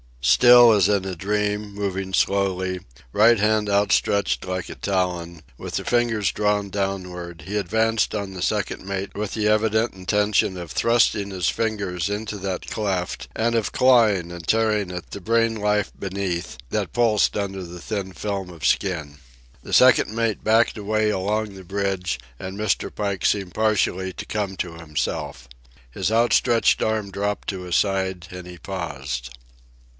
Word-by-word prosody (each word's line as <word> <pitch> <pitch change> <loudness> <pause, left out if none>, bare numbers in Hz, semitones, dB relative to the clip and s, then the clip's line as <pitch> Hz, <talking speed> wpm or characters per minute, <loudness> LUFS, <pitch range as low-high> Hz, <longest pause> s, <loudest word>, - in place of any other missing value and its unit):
Still 120 - +7
as 100 -4 +4
in 100 -2 +2
a 95 -1 -4
dream, 105 +2 -1
moving 95 -2 -3
slowly, 95 -2 +1 0.3
right 115 - +5
hand 105 0 +2
outstretched 100 0 +2
like 90 -1 -4
a - - -7
talon, 90 -4 -2 0.2
with - - -6
the - - -2
fingers 115 -5 +1
drawn 105 -1 0
downward, 90 -3 -4
he 105 +2 -2
advanced 110 +3 +1
on 100 -2 -4
the 90 - -7
second 105 0 -1
mate 100 0 -4
with 105 0 -3
the 105 -1 0
evident 110 +2 +2
intention 100 0 +1
of 85 -3 -7
thrusting 115 -3 +2
his 90 -6 0
fingers 100 -5 -2
into 105 +1 -4
that 95 -1 -4
cleft 95 -4 -2
and 115 +1 +1
of 115 -2 0
clawing 110 -9 +4
and 85 -2 -9
tearing 110 -4 +1
at 90 -1 -7
the 100 - -7
brain 115 +2 +2
life 105 -1 0
beneath 95 -6 -3
that - - -2
pulsed 115 -4 +2
under 95 -2 -3
the 90 0 -9
thin 100 -3 -4
film 95 +1 -4
of 85 -4 -7
skin. 80 -7 0 0.5
The - - -8
second - - +6
mate 115 -2 -1
backed 115 +2 +3
away 110 +1 0
along 105 +1 -1
the 95 -1 -11
bridge, 95 -5 -2 0.2
and 95 +1 -6
Mr. 105 -1 -1
Pike 100 -3 -2
seemed 100 -3 +1
partially 95 -4 +1
to - - -7
come 100 -3 -3
to 85 -2 -3
himself. 75 -6 -4 0.4
His 95 - -1
outstretched 115 +1 +3
arm 110 -2 -1
dropped 100 +1 -3
to 95 -2 -4
his 90 -2 -2
side, 95 -3 0
and 90 -1 -8
he 90 0 -10
paused. 70 -9 -5
100 Hz, 160 wpm, -23 LUFS, 90-105 Hz, 0.5 s, Still